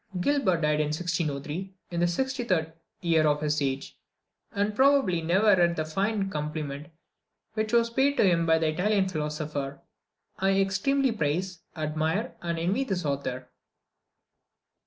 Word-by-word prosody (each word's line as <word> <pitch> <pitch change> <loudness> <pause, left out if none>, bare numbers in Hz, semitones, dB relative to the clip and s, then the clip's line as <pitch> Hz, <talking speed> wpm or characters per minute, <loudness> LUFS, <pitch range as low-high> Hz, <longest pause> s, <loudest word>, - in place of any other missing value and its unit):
Gilbert 190 - +2
died 150 -1 +2
in 150 - +1
1603, 165 +2 -3 0.2
in 170 - -2
the 175 - +3
63d 185 - -1 0.3
year 160 -3 +3
of 150 0 +2
his 150 0 0
age, 135 0 -3 0.5
and 205 +1 -1
probably 265 -10 +4
never 190 +5 +4
read 175 -1 +3
the 155 - -2
fine 195 +5 -1
compliment 150 -3 -4 0.7
which 215 0 -1
was 235 -1 +3
paid 275 +3 +2
to - - +4
him 170 -4 +3
by 160 0 +5
the 160 -1 +1
Italian 195 +4 +1
philosopher 150 -4 -3 0.6
"I 195 0 +2
extremely 250 +8 +2
praise, 180 -1 -2 0.2
admire, 155 +7 -1
and 170 -1 -2
envy 185 +10 0
this 190 -9 -2
author." 130 -3 -3
170 Hz, 140 wpm, -27 LUFS, 155-200 Hz, 0.7 s, by